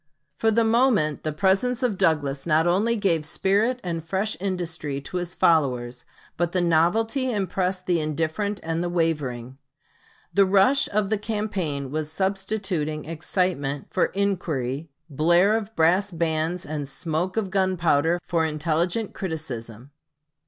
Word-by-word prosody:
] - - -50
For 225 - +3
the 230 +1 +3
moment 225 - +2
the 155 - -2
presence 200 - +1
of 240 -5 +1
Douglas 145 -4 0
not 160 0 +3
only 200 +7 +2
gave 185 -7 +1
spirit 205 +10 +1
and 165 -3 -3
fresh 195 +6 -1
industry 175 -7 -3
to 180 - -5
his 175 -1 -3
followers, 125 -6 +1 0.3
but 175 0 0
the 185 - +2
novelty 215 - +2
impressed 185 -2 -1
the 175 -2 +2
indifferent 160 +7 -2
and 165 +1 -1
the 175 - -1
wavering. 140 -7 -2 0.7
The 200 -1 +4
rush 200 +9 +4
of 205 -1 0
the 215 - +1
campaign 195 - -3
was 155 0 -3
substituting 190 -5 -2
excitement 160 -3 -2
for - - +2
inquiry, 165 -8 -2 0.2
blare 175 +7 +3
of 220 0 -4
brass 180 +5 +3
bands 165 0 -1
and 145 -2 -4
smoke 170 +6 -2
of 200 -4 -1
gunpowder 175 -4 +2
for 170 -2 +1
intelligent 165 +7 -1
criticism. 130 - -6
175 Hz, 140 wpm, -24 LUFS, 155-200 Hz, 0.7 s, The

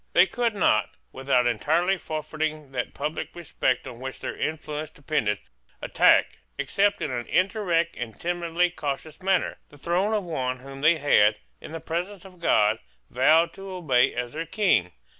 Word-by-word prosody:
They 175 - +7
could 230 +3 -1
not, 110 - +3 0.2
without 130 -2 +1
entirely 160 - +2
forfeiting 155 -3 -4
that 125 -2 -4
public 155 +2 -4
respect 140 -6 -1
on 125 -3 -9
which 130 0 -6
their - - -5
influence 155 -1 -4
depended, 140 -9 -1 0.4
attack, - - +3 0.2
except 205 +1 +1
in 145 - -2
an 120 -1 -3
indirect 185 -3 +1
and 115 -3 -6
timidly 175 0 0
cautious 150 +1 -5
manner, 190 -1 +1
the 145 - -16
throne 180 +8 0
of 210 - -1
one 130 -7 -2
whom 135 +1 -10
they 160 +3 +5
had, 110 -8 +4 0.3
in - - -9
the 165 - -5
presence 180 +5 -4
of 185 -2 -14
God, 110 -9 +3 0.3
vowed 155 +7 +4
to 195 0 -9
obey 140 -9 +2
as 120 0 -3
their 165 +2 -4
King. 165 - +2
155 Hz, 160 wpm, -25 LUFS, 130-175 Hz, 0.4 s, They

